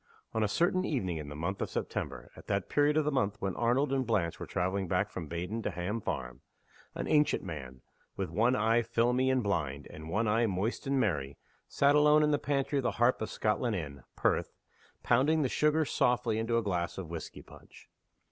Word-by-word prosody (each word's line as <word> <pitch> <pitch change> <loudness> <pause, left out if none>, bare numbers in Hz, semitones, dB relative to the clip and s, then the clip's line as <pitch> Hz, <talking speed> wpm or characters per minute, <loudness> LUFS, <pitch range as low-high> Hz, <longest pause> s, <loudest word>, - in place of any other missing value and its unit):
ON 110 - 0
a 105 - +3
certain 175 - +1
evening 95 - -1
in 75 -2 -6
the 75 - -7
month 85 +6 -3
of - - -2
September - - -4
(at - - -14
that 100 -2 -1
period 145 +1 +3
of 155 - +2
the 150 - +1
month 105 -7 0
when 95 -2 -2
Arnold 130 +4 +1
and 135 -1 +1
Blanche 100 -9 0
were - - -6
traveling 95 +1 -1
back 90 +4 0
from 85 -4 -6
Baden 90 +8 -4
to - - -2
Ham 95 +6 -3
Farm) 60 -7 -4 0.5
an - - -3
ancient 150 -1 +3
man 65 -5 -8 0.3
with 95 -4 -3
one 115 +8 +3
eye 115 +1 +3
filmy 120 +3 +1
and 130 -2 +2
blind, 75 -8 -2
and 80 +1 -9
one 105 +6 0
eye 115 +2 +3
moist 100 +7 -2
and 135 0 +1
merry 70 - -1 0.3
sat 140 +1 +3
alone 150 +1 +5
in 150 - +3
the 145 - +2
pantry 140 0 0
of - - -2
the - - +1
Harp 120 +1 +2
of 110 - -2
Scotland 110 +1 0
Inn, 70 -6 -5
Perth, - - 0 0.5
pounding 145 +6 +3
the 130 - 0
sugar 150 +3 +2
softly 120 -4 +1
in 115 +1 -3
a 115 -1 +2
glass 90 -4 -2
of 90 -4 -6
whisky 85 - -7
punch. - - -16
110 Hz, 210 wpm, -31 LUFS, 90-130 Hz, 0.5 s, alone